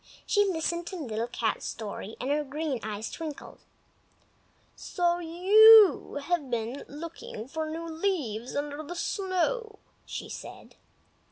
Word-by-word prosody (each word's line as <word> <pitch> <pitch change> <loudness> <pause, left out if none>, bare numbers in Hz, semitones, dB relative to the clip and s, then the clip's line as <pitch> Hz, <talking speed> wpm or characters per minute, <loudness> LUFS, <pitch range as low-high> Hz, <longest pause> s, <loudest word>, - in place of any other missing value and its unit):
She 410 -1 +3
listened 340 -1 -1
to 380 - -5
Little 235 -8 -3
Cat's 235 -2 -2
story, 215 0 -6
and 265 - -2
her 300 +1 +1
green 290 -1 -3
eyes 215 0 -5
twinkled. 315 -3 -7 1.2
"So 350 -1 0
you 390 +3 +7
have 315 -4 -1
been 235 +3 -3
looking 300 -7 -8
for 315 +2 -4
new 330 +1 -5
leaves 315 - -2
under 290 +1 -3
the 310 +3 -7
snow!" 410 +5 -1 0.3
she - - -6
said. - - -10
320 Hz, 125 wpm, -28 LUFS, 260-355 Hz, 1.2 s, you